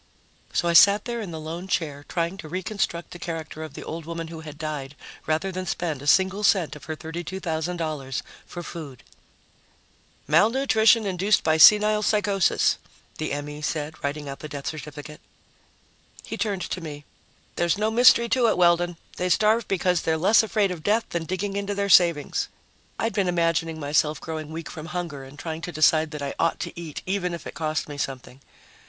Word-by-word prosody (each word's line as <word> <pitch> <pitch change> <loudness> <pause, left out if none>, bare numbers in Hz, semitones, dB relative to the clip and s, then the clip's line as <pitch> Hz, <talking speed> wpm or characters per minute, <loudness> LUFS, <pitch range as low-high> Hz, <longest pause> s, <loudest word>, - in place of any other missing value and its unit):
So 175 - 0
I 170 - +2
sat 200 +5 +7
there 235 -1 -3
in 205 - -6
the 160 -2 -6
lone 165 +4 -6
chair, 150 -6 -2
trying 170 +1 -1
to 160 -5 -9
reconstruct 185 -1 -3
the 175 - -9
character 160 -2 -5
of 155 -2 -8
the - - -7
old 165 0 -6
woman 165 -1 -5
who 165 -1 -8
had 155 -2 -9
died 150 -3 -5 0.3
rather 160 +5 0
than 185 0 -5
spend 160 -7 -2
a 145 - -8
single 190 +5 +3
cent 180 -8 +3
of 145 -2 -12
her 160 - -4
$32,000 160 -4 -4 0.3
for 175 - -7
food. 150 -8 -8 1.2
"Malnutrition 220 - +4
induced 195 +2 +2
by 160 0 +3
senile 210 +6 +7
psychosis," 205 -3 +2 0.4
the 155 - -2
M.E. 145 +1 -5
said, 150 0 -2
writing 145 +1 -3
out 140 0 -6
the 155 - -8
death 145 -1 -7
certificate. 150 -1 -7 1.0
He - - -5
turned 200 -5 -2
to 185 - -4
me. 145 -3 -8 0.5
"There's 175 +1 +1
no 215 +1 0
mystery 235 0 +6
to 245 -1 +3
it, 220 - +2
Weldon. 175 -1 +3 0.2
They 180 - -1
starve 215 +5 +3
because 180 -2 +1
they're 160 0 0
less 195 +7 +5
afraid 215 -3 +1
of 175 -3 -6
death 215 +6 +1
than 170 -1 -3
digging 190 +4 -3
into 200 0 -2
their 200 0 -1
savings." 170 -6 +4 0.5
I'd 225 -1 -1
been 195 -2 +1
imagining 165 -2 0
myself 150 +1 +1
growing 155 -1 -6
weak 160 +1 -6
from 155 0 -8
hunger 170 -6 -5
and 135 +2 -13
trying 160 +1 -5
to 175 - -5
decide 155 0 +3
that 150 -2 -6
I 140 - -3
ought 165 - +1
to - - -4
eat 165 -3 -7
even 180 -2 -1
if 170 - -10
it - - -7
cost 155 -1 -2
me 145 -1 -8
something. 130 -1 -5
170 Hz, 185 wpm, -25 LUFS, 155-190 Hz, 1.2 s, sat